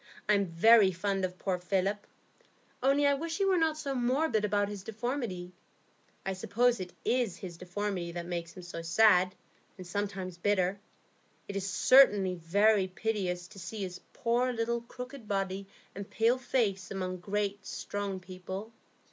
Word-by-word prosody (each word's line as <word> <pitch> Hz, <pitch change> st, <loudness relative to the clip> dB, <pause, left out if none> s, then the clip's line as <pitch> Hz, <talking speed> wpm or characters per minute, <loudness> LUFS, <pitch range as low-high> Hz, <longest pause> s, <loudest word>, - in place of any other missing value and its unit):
I'm 200 Hz, -2 st, +3 dB
very 195 Hz, +4 st, +6 dB
fond 195 Hz, +2 st, -1 dB
of 180 Hz, 0 st, -6 dB
poor 185 Hz, -2 st, -1 dB
Philip, 195 Hz, +3 st, -1 dB, 0.7 s
only 275 Hz, +3 st, +3 dB
I 285 Hz, -, +5 dB
wish 325 Hz, +4 st, -3 dB
he 395 Hz, -, +2 dB
were 385 Hz, -1 st, +3 dB
not 320 Hz, -1 st, +2 dB
so 285 Hz, -3 st, -3 dB
morbid 250 Hz, -2 st, +1 dB
about 205 Hz, -1 st, +1 dB
his 205 Hz, -1 st, -6 dB
deformity. 220 Hz, -4 st, -4 dB, 0.7 s
I 195 Hz, -, -1 dB
suppose 235 Hz, +6 st, +1 dB
it 180 Hz, -1 st, -5 dB
is 240 Hz, -6 st, +1 dB
his 180 Hz, -3 st, -7 dB
deformity 180 Hz, 0 st, -3 dB
that 170 Hz, 0 st, -4 dB
makes 170 Hz, -1 st, -4 dB
him 180 Hz, -, -8 dB
so 175 Hz, -1 st, -6 dB
sad, 185 Hz, +1 st, +4 dB, 0.4 s
and 185 Hz, -, -9 dB
sometimes 190 Hz, -1 st, -4 dB
bitter. 195 Hz, 0 st, +1 dB, 0.7 s
It 200 Hz, -, -6 dB
is 195 Hz, 0 st, -2 dB
certainly 205 Hz, -4 st, +6 dB
very 195 Hz, +4 st, +3 dB
piteous 185 Hz, -3 st, -2 dB
to 195 Hz, -, -12 dB
see 210 Hz, +2 st, -5 dB
his 180 Hz, -1 st, -6 dB
poor 240 Hz, +2 st, +1 dB
little 235 Hz, 0 st, -1 dB
crooked 250 Hz, 0 st, -9 dB
body 195 Hz, -1 st, -2 dB, 0.3 s
and 200 Hz, +1 st, -7 dB
pale 230 Hz, +4 st, +2 dB
face 210 Hz, -7 st, 0 dB
among 185 Hz, -1 st, -3 dB
great, 200 Hz, +2 st, -2 dB
strong 200 Hz, -2 st, -4 dB
people." 185 Hz, +4 st, -7 dB
200 Hz, 155 wpm, -31 LUFS, 185-230 Hz, 0.7 s, very